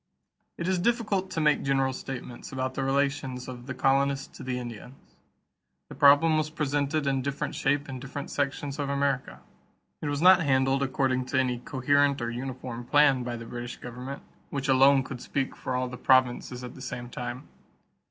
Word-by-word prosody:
= - - -50
It 170 - -3
is 185 -1 +1
difficult 205 -3 0
to 185 - -3
make 150 -1 +3
general 135 -1 +1
statements 125 -2 -7
about 130 -1 -2
the 135 - -2
relations 135 -2 -1
of 125 0 -8
the 130 - -4
colonists 135 +1 +1
to - - -10
the 125 -1 -3
Indians. 120 +2 -9 0.7
The - - -8
problem 145 +3 +6
was 155 0 -1
presented 145 0 -1
in 135 -1 +1
different 140 +1 -3
shape 145 +1 0
in 130 -2 -6
different 140 +2 -6
sections 145 0 -2
of 140 -1 -1
America. 140 -2 -1 0.6
It 150 - -3
was 145 -1 -1
not 185 +2 +7
handled 135 -2 +2
according 130 -1 0
to 130 - +1
any 125 -2 0
coherent 140 +2 +2
or 120 -1 -2
uniform 125 -1 -5
plan 140 0 +4
by 120 -1 -3
the 115 - -8
British 120 +1 -6
government, 125 +3 -7 0.3
which 135 -1 -3
alone 135 +1 +5
could 125 -1 -7
speak 135 -2 -2
for 130 - -4
all 125 0 0
the 125 0 -7
provinces 125 -1 +2
at 125 - -7
the - - -12
same 125 -1 -5
time. 120 +3 -6
135 Hz, 185 wpm, -27 LUFS, 125-145 Hz, 0.7 s, not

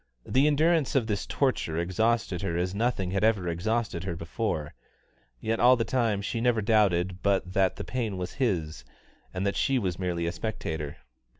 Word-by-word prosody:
The 135 +3 +3
endurance 155 0 +2
of 130 -4 +3
this 105 -2 -2
torture 130 - 0
exhausted 95 +2 0
her 85 -4 -2
as 90 +1 -1
nothing 100 -4 0
had 100 +2 0
ever 105 -5 +2
exhausted 90 +2 -1
her 90 -3 -3
before; 80 -2 -3 0.7
yet 115 - -1
all 125 +1 +7
the 115 - 0
time 115 -6 0
she 115 +3 -2
never 120 -2 +2
doubted 95 -4 +2
but 95 -2 +1
that 95 -1 +2
the - - -5
pain 115 -6 -3
was 90 0 -4
his, 80 - -1 0.5
and 95 +2 -3
that 100 - 0
she 135 - +2
was 95 -7 -2
merely 85 -2 -1
a 85 - 0
spectator. 80 -7 -4
100 Hz, 180 wpm, -28 LUFS, 90-115 Hz, 0.7 s, all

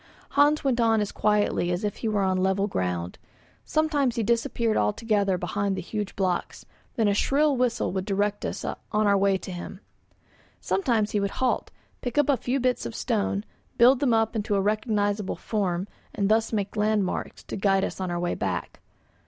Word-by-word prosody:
Hans 290 +2 +3
went 260 -3 +1
on 225 -1 +3
as 210 -1 -1
quietly 210 -4 +1
as 175 +3 -2
if 205 -1 -2
he 230 - -3
were 210 -2 +1
on 190 -1 +1
level 190 +1 +2
ground; 90 - -3 0.5
sometimes 295 -5 +1
he 230 - 0
disappeared 230 0 +1
altogether 200 - +1
behind 200 +2 -1
the - - -2
huge 205 +2 -4
blocks, 185 -2 -2 0.3
then 225 -3 +2
a 200 - +3
shrill 285 +7 +2
whistle 245 -2 0
would 190 0 -2
direct 205 0 -1
us - - -4
on - - -3
our 210 -2 +3
way 195 0 +3
to 185 - -8
him. 180 +1 -7 0.8
Sometimes 230 - 0
he 210 - +1
would 200 0 0
halt, 260 -1 0 0.3
pick 245 +1 -4
up 295 -1 +3
a 280 - +5
few 250 +4 -1
bits 250 - 0
of 115 - -8
stone, 95 0 -1 0.3
build 245 +2 +6
them 275 -4 +2
up 225 0 +2
into 210 -1 0
a - - +2
recognisable 210 -1 0
form, 190 -4 -2 0.3
and 200 -1 0
thus 220 +1 +2
made 205 -2 -2
landmarks 210 -2 -1
to - - -6
guide 195 -1 +2
us - - -6
in 185 -1 -2
our 175 0 -2
way 175 0 -1
back. 90 -2 -3
210 Hz, 190 wpm, -26 LUFS, 190-230 Hz, 0.8 s, build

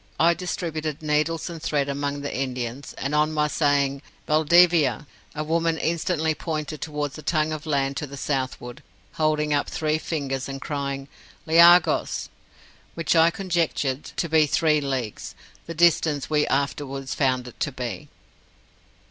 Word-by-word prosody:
I 170 +1 +5
distributed 160 -4 -4
needles 155 +2 0
and 170 -3 -7
thread 145 -3 0
among 140 0 -3
the 145 - -4
Indians, 130 0 -4
and 140 +2 -4
on 150 +1 +2
my 150 -1 +1
saying 140 -2 +1 0.2
'Valdivia,' 155 -4 +4 0.3
a 155 - -2
woman 165 +1 0
instantly 160 -1 0
pointed 155 -1 -4
towards 150 -1 -4
a - - -8
tongue 155 0 0
of 155 +1 -7
land 140 -2 0
to 150 - -3
the 140 +1 -9
southward, 130 -1 -3 0.4
holding 150 -1 +2
up 145 - 0
three 155 0 -1
fingers, 140 -4 -3
and 135 0 -5
crying 140 -2 -4 0.4
'leaghos'! 170 +2 +5 0.7
which 165 0 0
I 165 0 +6
conjectured 165 -7 -1
to 170 - -3
be 160 -1 +4
three 155 0 +2
leagues; 130 -6 -4 0.3
the 165 - -6
distance 155 -5 +2
we 150 -1 +2
afterwards 135 -1 -2
found 130 -3 0
it 125 - -12
to 140 - -1
be. 125 -2 -6
150 Hz, 150 wpm, -24 LUFS, 140-160 Hz, 0.7 s, I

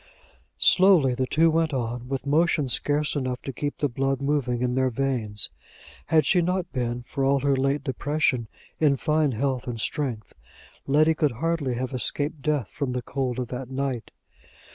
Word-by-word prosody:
Slowly 180 -9 +5
the 130 +1 -1
two 165 +4 +3
went 160 -2 +1
on, 120 0 -3
with 135 +1 -3
motion 150 0 +2
scarce 150 +4 +1
enough 130 -3 -2
to 135 - -5
keep 145 +3 -3
the 145 - +1
blood 135 +1 -1
moving 135 -4 0
in 125 0 0
their 130 0 +2
veins. 115 - -2 0.6
Had 155 -3 +3
she 175 +6 +4
not 180 +1 -1
been, 120 -2 -2
for 135 +2 -3
all 135 0 +3
her 140 0 +2
late 135 +2 0
depression, 135 -3 0 0.3
in 150 -3 +4
fine 150 +3 +1
health 130 +2 -1
and 120 -2 -4
strength, 115 - -3 0.5
Letty 155 +3 +4
could 150 -4 0
hardly 145 -1 -1
have 130 +2 -3
escaped 145 +5 -1
death 145 -8 0
from 140 -4 -3
the 125 -1 -3
cold 130 -2 -2
of 125 -2 -3
that 125 0 -5
night. 135 -3 -3
135 Hz, 175 wpm, -25 LUFS, 125-150 Hz, 0.6 s, Slowly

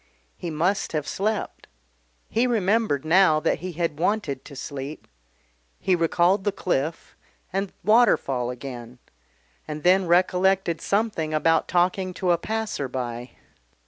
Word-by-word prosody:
He 175 - -6
must 170 +6 0
have 150 -2 -2
slept. 210 +1 -3 0.6
He 240 +3 +1
remembered 210 - +1
now 160 -1 +5
that - - 0
he 180 +2 -6
had 165 -2 -2
wanted 175 -8 -1
to 140 - -11
sleep. 140 +2 -7 0.7
He 185 - +2
recalled 175 +3 +2
the 205 - +1
cliff 165 -4 -2 0.4
and 195 0 -1
Waterfall 205 - +3
again, 125 -1 -8 0.7
and 150 0 -6
then 185 +1 +4
recollected 180 0 +2
something 200 -7 0
about 165 +1 +2
talking 185 +1 +1
to 180 -2 0
a 170 - +2
passer 220 -9 -3
by.... 125 -1 -5
175 Hz, 130 wpm, -24 LUFS, 150-195 Hz, 0.7 s, now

